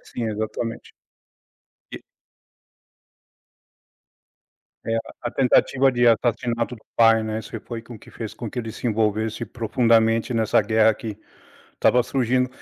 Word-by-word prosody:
Sim, 115 -2 -2
exatamente. 110 +2 -5 1.0
E - - -7 2.9
É 115 - 0
a - - +1 0.2
a 120 - -2
tentativa 135 +1 +3
de 120 -1 +1
assassinato 120 +1 +1
do 110 - -18 0.2
pai, 115 -1 +5
né, 110 0 -3
isso 110 +1 -7
foi 115 -2 -6
com 120 +1 -12
o - - -13
que - - -16
fez 110 -3 -7
com 115 -3 -6
que 125 - -5
ele 115 -1 -5
se - - -8
envolvesse 110 0 0
profundamente 115 +1 +1
nessa 110 -1 +2
guerra 110 +1 +3
que 110 -2 -7 0.6
estava 125 - +3
surgindo. 125 0 +1
115 Hz, 140 wpm, -23 LUFS, 110-120 Hz, 2.9 s, pai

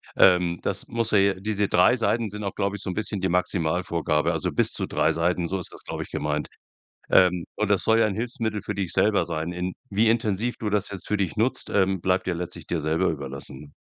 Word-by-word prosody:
Ähm, 90 -2 +4
das - - -1
muss 115 -1 -1
ja 105 - +5
je 95 -1 +2
diese 105 0 0
3 90 +8 +4
Seiten 115 -2 0
sind 105 +1 -6
auch, 100 - -4
glaube 100 0 -1
ich, - - -11
so 100 - -4
'n - - -2
bisschen 105 -2 -1
die 95 - +1
Maximalvorgabe 85 -3 0
also - - -1
bis - - +2
zu - - -3
3 80 - +1
Seiten, 85 +2 0
so 95 +2 -2
ist 90 - 0
das, - - -9
glaube - - -5
ich, - - -13
gemeint. 75 0 -2 0.6
Ähm, 90 -2 +5
und 105 -1 -1
das 100 -2 +3
soll 110 0 +4
ja 115 - +5
'n 105 - -2
Hilfsmittel 115 -2 -3
für 105 - -5
dich 95 -3 -2
selber 105 -1 +3
sein. 80 0 -3
In 90 +1 -3 0.2
wie 105 +3 +2
intensiv 110 +1 +1
du 110 - -3
das 105 -1 0
jetzt 95 -3 -8
für 105 - 0
dich 95 -4 -1
nutzt, 115 +4 0
ähm, 95 -1 +2
bleibt 95 +2 0
ja 90 - 0
letztlich 90 +1 -4
dir 85 - -1
selber 80 +4 +1
überlassen. 70 -1 -6
95 Hz, 240 wpm, -25 LUFS, 85-105 Hz, 0.6 s, ja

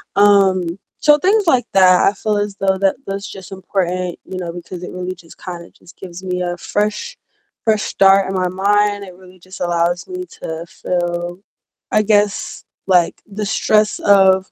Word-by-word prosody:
Um, 195 -4 +4 0.2
so 295 -1 +5
things 390 +5 +2
like 255 -6 +3
that, 185 -2 +5
I 195 - +3
feel 210 0 -1
as 205 -1 -2
though 190 -1 +1
that 195 -1 +2
those 195 +1 -4
just 190 -1 -10
important, 185 -2 -3
you 185 - -7
know, 175 -2 -5
because 175 +1 -8
it - - -7
really 180 0 -5
just 170 -2 -17
kinda 175 -1 -8
just 175 - -19
gives 180 0 -10
me 180 -1 -2
a 175 0 -2
fresh 210 - -2 0.5
fresh 215 -1 +2
start 195 0 +4
in 195 - -3
my 185 -1 +1
mind, 205 +2 +1
it 185 -2 -11
really 185 0 -17
just 185 +2 -13
allows 175 0 0
me 365 0 -5
to 160 0 -7
feel, 175 -1 -3 0.5
I 215 - +3
guess, 205 -1 0 0.2
like 180 -3 +3
the 210 +1 -5
stress 215 +1 +2
of 190 -2 +4
190 Hz, 180 wpm, -18 LUFS, 180-205 Hz, 0.5 s, so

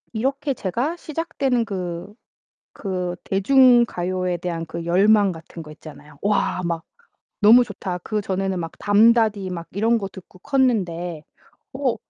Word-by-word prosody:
이렇게 275 +5 -1
제가 245 - -2
시작되는 285 -7 -1
그, 180 -2 -5 0.6
그 180 -3 -4
대중가요에 195 -5 +3
대한 170 -1 -4
그 165 +1 -6
열망 200 +3 +4
같은 165 0 -10
거 155 - -12
있잖아요. 150 -1 -14
'와 200 -2 0
막 170 -1 -2 0.6
너무 230 +4 +8
좋다.' 185 -6 -5
그 215 -1 -2
전에는 190 -1 -2
막 165 -1 -5
담다디 215 -1 +3
막 170 -2 -6
이런 225 +4 +2
거 200 -3 -4
듣고 185 -1 -14
컸는데 180 - 0 0.5
어 265 -2 0
195 Hz, 260 characters per minute, -22 LUFS, 175-235 Hz, 0.6 s, 너무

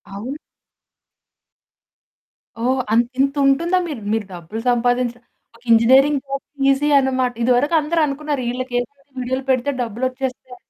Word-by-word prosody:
అవును. 255 +9 -6 2.3
ఓహ్! 260 +1 +1
అంత 235 +1 +3
ఇంత 275 +1 +2
ఉంటుందా? 335 +7 +2
మీరు 275 -8 -6
మీరు 220 -2 -1
డబ్బులు 175 +6 -7
సంపాదించడానికి 245 0 -2
ఇంజినీరింగ్ 265 +5 +5
జాబ్ 275 0 -4 0.3
ఈజీ 295 +2 +1
అనమాట. 260 -2 0
ఇదివరకు 255 +6 +2
అందరనుకున్నారు. 300 -3 -1
ఈళ్ళకేంటి, 245 0 -3 0.3
వీడియోలు 260 +1 -2
పెడితే 255 +2 +1
డబ్బులొచ్చేస్తాయి. 255 +2 -4
255 Hz, 105 wpm, -20 LUFS, 245-275 Hz, 2.3 s, ఇంజినీరింగ్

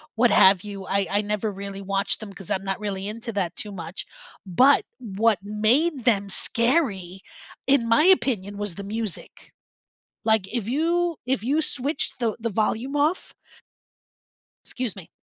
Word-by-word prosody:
what 235 0 +4
have 190 -2 +6
you, 200 -2 -7
I 200 0 0
I 205 +1 +1
never 210 +1 -2
really 195 0 -7
watched 195 0 -1
them 210 -2 -8
'cause 190 -1 -10
I'm 190 - 0
not 195 -1 -3
really 200 -2 -3
into 230 +2 -4
that 180 -4 -2
too 210 - -6
much, 175 -1 -7 0.4
but 255 +10 +4
what 220 -1 +1
made 235 +8 +1
them 200 -5 +2
scary, 205 - 0 0.5
in 270 -4 +3
my 230 +6 +4
opinion, 235 - +2
was 205 -4 -3
the 200 - -7
music, 215 -1 -5 0.7
like, 220 -4 +3
if 235 -4 -2
you 335 +4 +1
if 250 -5 0
you 285 +6 +1
switched 280 -1 -2
the 230 -3 0
the 230 +1 -2
volume 225 +6 -1
off 300 +5 0 1.3
Excuse 250 -5 -3
me, 185 -3 -10
215 Hz, 160 wpm, -24 LUFS, 195-250 Hz, 1.3 s, have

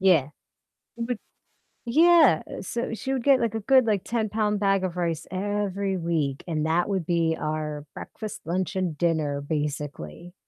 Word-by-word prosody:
Yeah. 175 -8 +4 0.7
Would 235 0 -2 0.7
yeah, 310 - +6
eh, - - -7
so 235 +4 -3
she 265 +4 -3
would 255 - -2
get, 275 -1 +5
like, 225 -2 -1
a 220 - -2
good, 260 +2 +5
like, 205 -4 +1
10-pound 215 -2 0
bag 195 -1 +2
of 180 -2 -2
rice 170 -3 -2
every 200 0 -1
week, 160 -6 -1
and 155 -2 -1
that 170 +2 +2
would 195 -3 -1
be 165 -1 +1
our 155 -1 -3
breakfast, 215 -2 -7
lunch, 185 +3 -2
and 185 -4 -1
dinner, 155 -3 0
basically, 145 - -4
185 Hz, 160 wpm, -26 LUFS, 160-215 Hz, 0.7 s, yeah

